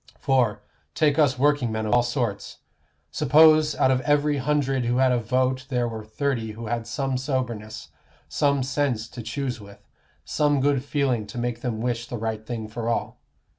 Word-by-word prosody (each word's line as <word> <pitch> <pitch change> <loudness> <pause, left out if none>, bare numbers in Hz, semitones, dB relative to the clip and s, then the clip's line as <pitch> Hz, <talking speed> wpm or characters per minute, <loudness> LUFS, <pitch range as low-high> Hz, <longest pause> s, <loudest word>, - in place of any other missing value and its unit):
For, 120 -7 +1 0.3
take 150 -1 +2
us 145 -4 +3
workingmen 125 -6 +1
of 105 - 0
all 120 - +5
sorts. 120 -4 -3 0.5
Suppose 155 +1 +5
out 130 - +3
of 130 -1 +1
every 145 +1 +2
hundred 135 -2 0
who 120 +1 +1
had 130 0 +4
a 125 - +2
vote 130 +3 0
there 125 -2 0
were 110 -2 -6
thirty 115 0 -2
who 115 +2 -8
had 115 0 -3
some 135 +1 -2
soberness, 125 -5 -4 0.4
some 140 -2 +1
sense 130 -4 -1
to 120 - -8
choose 125 0 -4
with, 100 0 -15 0.4
some 145 -2 +1
good 140 -1 +1
feeling 135 -7 -1
to 105 - -9
make 120 0 -3
them 115 -3 -3
wish 120 -1 -2
the 120 - -5
right 110 -1 -3
thing 110 -1 -5
for 115 +1 -4
all. 115 - -2
125 Hz, 175 wpm, -24 LUFS, 115-140 Hz, 0.5 s, all